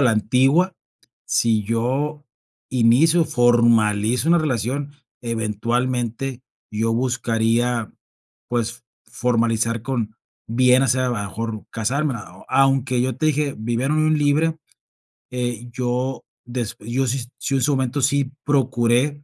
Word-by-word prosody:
a - - +3
la 125 - +5
antigua. 135 - +3 0.5
Si 110 -2 +2
yo 135 +7 -1 0.5
inicio, 130 +8 +4
formalizo 120 0 +3
una 170 0 +5
relación, 140 0 -2 0.3
eventualmente 120 +3 -2 0.3
yo 110 +2 0
buscaría, 115 -1 0 0.6
pues, 120 0 -2 0.2
formalizar 115 -1 0
con, 115 -5 -3 0.3
bien 125 +2 +4
hacer, 130 0 +2
a 125 - +1
lo 120 - -1
mejor 110 +2 -4
casarme. 130 +5 -1
Ah, 95 -3 -11
o, - - -16
aunque 135 -2 +2
yo 125 -1 -1
te 155 - 0
dije, 150 -2 0
vivir 120 +3 -1
en 150 - +1
unión 155 0 +2
libre, 155 +3 +2 0.8
eh, 120 -1 -3
yo, 125 +2 -2 0.2
des 120 -3 -4
yo 125 +5 -1
si, 125 0 -2
si 135 - -1
en 135 - +1
su 150 - +2
momento 130 +1 -1
sí 140 0 +1
procuré, 130 +1 +1
125 Hz, 130 wpm, -21 LUFS, 115-135 Hz, 0.8 s, la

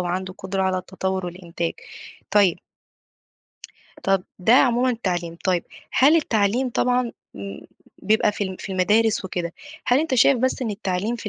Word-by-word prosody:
وعنده 185 +1 -3
قدرة 190 0 -2
على 185 -1 +1
التطوّر 190 0 -3
والإنتاج. 170 -1 -4 0.6
طيب 200 -4 +4 1.4
طَب 195 -1 +1
ده 190 +5 +3
عمومًا 250 0 +4
التعليم. 175 -7 -2
طيب، 180 -2 +1 0.3
هل 290 +5 +5
التعليم 240 -3 +1
طبعًا 250 0 +1 0.2
م 100 0 -7 0.4
بيبقى 215 0 +3
في 205 - -2
ال 190 -1 -5
في 195 - -6
المدارس 210 +4 +2
وكده، 175 -2 -3 0.3
هل 250 +1 +4
أنت 315 -4 -1
شايف 255 +2 +5
بس 260 +1 0
إن 225 - -2
التعليم 200 +2 -2
في 220 - -6
195 Hz, 150 wpm, -23 LUFS, 185-235 Hz, 1.4 s, هل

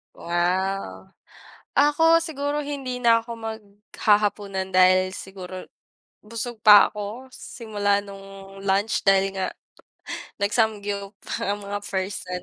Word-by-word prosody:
Wow. 175 - -2 0.7
Ako 325 +3 +4
siguro 295 -2 -2
hindi 275 -3 -4
na 230 -1 +6
ako 235 0 -7
maghahapunan, 205 -2 -1
dahil 185 0 +4
siguro, 185 -1 -8 0.6
busog 230 +2 -5
pa 205 -1 +8
ako, 210 +5 -7
simula 205 -3 -1
nung 195 -1 -12
lunch 200 +2 +1
dahil 195 0 +3
nga, 190 -1 -2 0.9
nag 200 +1 0
samgyup 205 -3 -1 0.3
ang 205 0 -2
mga 200 +1 -4
person. 185 -2 -4
205 Hz, 105 wpm, -24 LUFS, 195-225 Hz, 0.9 s, pa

